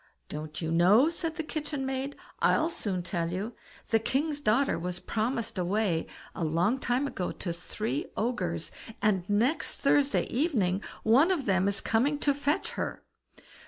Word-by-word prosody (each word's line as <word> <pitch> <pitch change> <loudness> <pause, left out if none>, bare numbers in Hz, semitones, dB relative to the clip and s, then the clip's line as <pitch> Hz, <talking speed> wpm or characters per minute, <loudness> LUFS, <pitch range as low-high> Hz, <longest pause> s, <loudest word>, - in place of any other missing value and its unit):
"Don't 155 +2 -6
you 160 - -1
know?" 195 - +6
said 330 -1 -3
the 325 - -2
kitchen 300 -3 -3
maid; 265 +1 -2 0.2
"I'll 320 +2 +3
soon 185 - -2
tell 170 -2 -2
you: 200 +6 -3 0.4
the 225 - +4
king's 285 +6 0
daughter 245 -2 +2
was 180 +1 -3
promised 225 -1 -2
away 180 -2 +1 0.3
a - - -3
long 170 +11 +2
time 250 +2 +1
ago 190 -10 -3
to 175 - -4
three 170 -3 -3
ogres, 180 -8 -1 0.3
and 195 -4 +1
next 235 +10 +1
Thursday 280 0 +3
evening 225 - +1 0.2
one 260 +10 +5
of 340 -8 0
them 190 -1 +2
is 200 +1 0
coming 265 +6 +2
to 285 -1 +2
fetch 285 +2 0
her. - - -4
220 Hz, 160 wpm, -29 LUFS, 180-280 Hz, 0.4 s, know